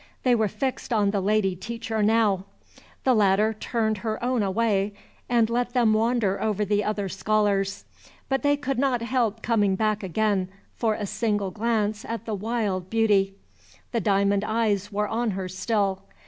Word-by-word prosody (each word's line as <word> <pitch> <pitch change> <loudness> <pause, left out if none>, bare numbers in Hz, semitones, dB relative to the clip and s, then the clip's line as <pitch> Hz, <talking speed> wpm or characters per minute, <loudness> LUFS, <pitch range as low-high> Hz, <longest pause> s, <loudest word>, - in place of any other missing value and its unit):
They 250 - +4
were 220 -2 +2
fixed 260 +6 -3
on 205 -3 +2
the 200 -1 0
lady 200 -1 +1
teacher 225 +3 -4
now. 210 -3 +2 0.6
The 260 - +4
latter 210 0 +3
turned 220 0 -1
her 220 0 -3
own 250 -1 +1
away, 200 0 +1 0.4
and 235 -2 +3
let 240 +1 -1
them 235 -4 +3
wander 220 -3 +1
over 210 -1 0
the 205 +1 +1
other 205 -1 -1
scholars. 200 0 0 0.4
But 270 -1 0
they 290 0 +2
could 275 -3 -2
not 255 -4 +1
help 230 -3 0
coming 205 -4 +2
back 215 +1 0
again 195 0 0 0.3
for 220 -2 0
a 210 - -3
single 205 -2 -1
glance 215 0 -1
at 230 0 -5
the 220 - -3
wild 205 -3 -2
beauty. 205 -3 +2 0.6
The 230 - 0
diamond 200 0 +2
eyes 210 -2 0
were 210 +1 0
on 230 +2 -1
her 190 -1 -3
still. 195 0 -1
215 Hz, 165 wpm, -25 LUFS, 200-230 Hz, 0.6 s, They